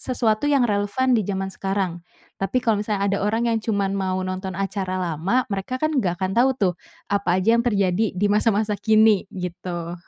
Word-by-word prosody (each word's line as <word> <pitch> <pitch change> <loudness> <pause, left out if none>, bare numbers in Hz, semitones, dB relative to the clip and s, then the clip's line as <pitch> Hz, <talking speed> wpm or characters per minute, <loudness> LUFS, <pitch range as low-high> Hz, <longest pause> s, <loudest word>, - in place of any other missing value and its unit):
sesuatu 240 +1 0
yang 275 -4 +3
relevan 210 +5 +1
di 230 - +4
jaman 195 -1 -3
sekarang. 195 -3 -2 0.4
Tapi 195 +6 0
kalau 215 -3 +2
misalnya 205 -2 -1
ada 200 0 +1
orang 225 +3 0
yang 225 - 0
cuman 200 -3 -1
mau 190 -1 -1
nonton 185 0 -4
acara 195 -1 -2
lama, 185 +8 0
mereka 200 +6 -3
kan, 310 +3 -1
gak 180 -5 -1
akan 185 0 -1
tau 245 +5 +4
tuh, 190 -6 +1 0.4
apa 195 -3 +1
aja 190 +5 +3
yang 235 - +1
terjadi 200 -3 +1
di 205 +3 +2
masa-masa 210 0 +2
kini 215 -2 +4
gitu. 175 -2 -5
200 Hz, 185 wpm, -23 LUFS, 185-220 Hz, 0.4 s, di